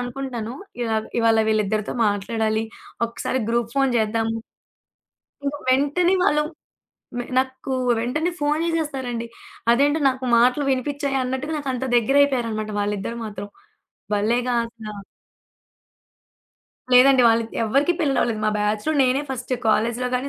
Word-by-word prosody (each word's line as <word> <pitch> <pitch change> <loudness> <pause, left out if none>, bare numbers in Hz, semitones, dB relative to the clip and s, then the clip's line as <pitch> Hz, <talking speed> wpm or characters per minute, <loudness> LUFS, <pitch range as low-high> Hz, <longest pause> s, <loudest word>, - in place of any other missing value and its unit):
అనుకుంటానో 245 -2 -5 0.3
ఇలాగా 220 -2 -1
ఇవాళ 225 -1 +4
వీళ్ళిద్దరితో 215 -1 0
మాట్లాడాలి, 220 +2 0 0.4
ఒక్కసారి 235 +2 -3
గ్రూప్ 235 0 0
ఫోన్ 270 -2 +3
చేద్దాము... 225 +1 0 1.1
...ఇంక 280 +1 -1 0.2
వెంటనే 295 +8 +2
వాళ్ళు 300 -5 +3 0.8
మ - - 0 0.2
నాకు 260 0 -1 0.3
వెంటనే 300 +9 -1
ఫోను 300 +2 +1
జేసేస్తారండి. 270 -8 -2 0.5
అదేంటో 290 +5 +2
నాకు 260 0 -4
మాటలు 250 +4 +3
వినిపించాయ 275 +1 -1
అన్నట్టుగా 260 +5 -3
నాకంత 265 -3 -3
దెగ్గరయిపోయారనమాట 240 -4 +2
వాళ్ళిద్దరూ 205 +3 -3
మాత్రం. 205 -1 -7 0.6
భల్లేెగా 240 +4 +1 0.2
స 210 -2 -8 1.9
లేదండి. 255 0 +7
వాళ్ళకి 230 0 +1
ఎవరికీ 275 +10 +2
పెళ్లిలవ్వలేదు. 255 -7 +1
మా 215 - +3
బ్యాచ్‌లో 210 +8 0
నేనే 260 +3 +2
ఫస్ట్ 255 0 -4 0.2
కాలేజ్‌లో 235 +3 +1
గాని, 255 +3 -1
245 Hz, 110 wpm, -22 LUFS, 225-275 Hz, 1.9 s, లేదండి